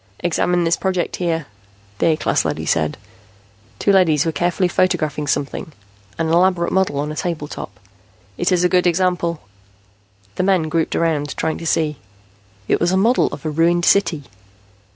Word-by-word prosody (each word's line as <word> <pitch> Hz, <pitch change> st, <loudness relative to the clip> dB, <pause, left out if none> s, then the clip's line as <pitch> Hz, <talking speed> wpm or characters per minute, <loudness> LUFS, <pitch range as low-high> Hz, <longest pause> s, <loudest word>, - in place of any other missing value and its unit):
"Examine 175 Hz, +1 st, +1 dB
this 165 Hz, 0 st, +1 dB
project 185 Hz, -2 st, -2 dB
here," 165 Hz, -3 st, -1 dB, 0.5 s
the -, -, +2 dB
A 160 Hz, -2 st, +3 dB
class -, -, 0 dB
leady -, -, -3 dB
said. -, -, 0 dB, 0.8 s
Two 200 Hz, -, +2 dB
leadys 165 Hz, -6 st, +3 dB
were 165 Hz, -, 0 dB
carefully 175 Hz, +4 st, 0 dB
photographing 155 Hz, -5 st, 0 dB
something, 145 Hz, +2 st, -2 dB, 0.4 s
an 165 Hz, -1 st, -1 dB
elaborate 175 Hz, +1 st, +2 dB
model 190 Hz, -6 st, +1 dB
on 150 Hz, +1 st, -2 dB
a -, -, -6 dB
table 160 Hz, -3 st, -3 dB
top. 105 Hz, -7 st, -8 dB, 0.6 s
"It 175 Hz, -, 0 dB
is 180 Hz, -1 st, +2 dB
a -, -, +5 dB
good 180 Hz, 0 st, +2 dB
example." 175 Hz, -2 st, 0 dB, 1.0 s
The -, -, +1 dB
men 185 Hz, -5 st, +2 dB
grouped 160 Hz, 0 st, 0 dB
around, 150 Hz, -3 st, -1 dB
trying 160 Hz, -1 st, -2 dB
to 165 Hz, -, -5 dB
see. 150 Hz, -3 st, 0 dB, 0.7 s
It -, -, +2 dB
was 175 Hz, +1 st, +1 dB
a 190 Hz, -, +2 dB
model 230 Hz, +6 st, +3 dB
of 145 Hz, -, -8 dB
a 155 Hz, -, -1 dB
ruined 170 Hz, +2 st, +2 dB
city. 170 Hz, -7 st, +2 dB
170 Hz, 170 wpm, -19 LUFS, 155-180 Hz, 1.0 s, a